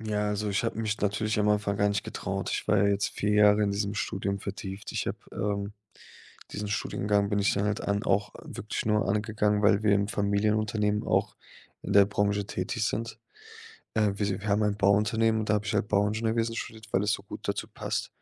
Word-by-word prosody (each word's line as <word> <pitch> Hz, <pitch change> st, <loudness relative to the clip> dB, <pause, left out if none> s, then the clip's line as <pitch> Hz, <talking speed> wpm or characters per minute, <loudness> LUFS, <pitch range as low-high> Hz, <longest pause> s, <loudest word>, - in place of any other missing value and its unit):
Ja, 105 Hz, -1 st, -1 dB
also, 105 Hz, 0 st, -1 dB
ich 100 Hz, -, 0 dB
habe 115 Hz, -, -2 dB
mich 110 Hz, -1 st, -1 dB
natürlich 105 Hz, +1 st, 0 dB
am 105 Hz, -, +2 dB
Anfang 105 Hz, -1 st, +1 dB
gar 105 Hz, -1 st, +3 dB
nicht 100 Hz, -1 st, -1 dB
getraut. -, -, -4 dB
Ich -, -, -3 dB
war 105 Hz, -, +4 dB
ja 100 Hz, -, +4 dB
jetzt 100 Hz, 0 st, +1 dB
4 105 Hz, 0 st, -1 dB
Jahre 105 Hz, 0 st, +5 dB
in 100 Hz, -, +2 dB
diesem 100 Hz, 0 st, -1 dB
Studium 100 Hz, -1 st, -2 dB
vertieft. 100 Hz, 0 st, -6 dB
Ich -, -, -2 dB
habe, -, -, -3 dB
ähm 100 Hz, 0 st, -2 dB, 0.8 s
diesen 105 Hz, 0 st, -4 dB
Studiengang 100 Hz, 0 st, 0 dB
bin 105 Hz, -, +1 dB
ich 100 Hz, -, +2 dB
dann 100 Hz, -, 0 dB
halt 105 Hz, -1 st, 0 dB
an 100 Hz, +2 st, -1 dB
auch 100 Hz, +1 st, +1 dB
wirklich 110 Hz, +1 st, -5 dB
nur 105 Hz, -2 st, +2 dB
angegangen, 105 Hz, 0 st, +1 dB
weil 105 Hz, 0 st, +4 dB
wir 105 Hz, -1 st, +4 dB
im 100 Hz, 0 st, +1 dB
Familienunternehmen 105 Hz, +1 st, +1 dB
auch -, -, +1 dB, 0.4 s
in -, -, -3 dB
der 100 Hz, 0 st, +8 dB
Branche 100 Hz, 0 st, 0 dB
tätig 100 Hz, +6 st, -3 dB
sind. 115 Hz, 0 st, -3 dB, 0.8 s
Äh, 105 Hz, -2 st, +2 dB
wir 100 Hz, -, -7 dB
s -, -, 0 dB
wir 100 Hz, +3 st, -4 dB
haben 105 Hz, +1 st, +2 dB
ein 105 Hz, -1 st, 0 dB
Bauunternehmen 105 Hz, +2 st, +3 dB
und 105 Hz, -, -5 dB
da 105 Hz, -, +4 dB
habe 105 Hz, 0 st, -2 dB
ich 100 Hz, -, -2 dB
halt 105 Hz, 0 st, 0 dB
Bauingenieurwesen 110 Hz, +3 st, +1 dB
studiert, 110 Hz, -1 st, -7 dB
weil 95 Hz, -, +3 dB
es 105 Hz, -, +1 dB
so -, -, -2 dB
gut -, -, -9 dB
dazu -, -, -2 dB
passt. -, -, -3 dB
105 Hz, 215 wpm, -28 LUFS, 100-105 Hz, 0.8 s, der